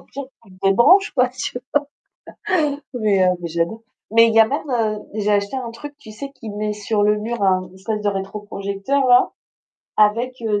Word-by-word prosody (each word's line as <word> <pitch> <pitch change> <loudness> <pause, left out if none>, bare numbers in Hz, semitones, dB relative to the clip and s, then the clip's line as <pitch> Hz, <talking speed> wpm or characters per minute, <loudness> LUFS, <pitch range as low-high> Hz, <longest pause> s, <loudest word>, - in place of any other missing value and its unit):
au - - -17
pire 280 0 -8 0.2
tu 215 - -20
te 185 - -17
débranches 300 - +5
quoi» 250 -2 +3
Tu 250 0 -5 1.1
vois? 285 +1 -8
Mais 210 -6 +2
heu, 180 - +4
mais 170 - -3
j'aime 170 +1 0
beaucoup, 225 0 -10 0.3
mais 230 +1 +6
il 225 - 0
y 225 - +8
en 220 - +3
a, 285 - -1 0.3
heu, 210 - -7
j'ai 210 -1 0
acheté 200 +5 0
un 240 -3 -5
truc, 290 +5 -10
tu 230 -7 -13
sais, 275 +6 -8
qui 245 -5 -10
met 210 +1 -2
sur 210 0 -1
le 210 0 +3
mur 225 +1 -4
un 185 -1 +2
espèce 210 +3 -4
de 205 - +1
rétroprojecteur-là, 205 +6 0 0.7
avec, 230 +4 +3
heu, 210 -2 0
215 Hz, 205 wpm, -20 LUFS, 200-245 Hz, 1.1 s, y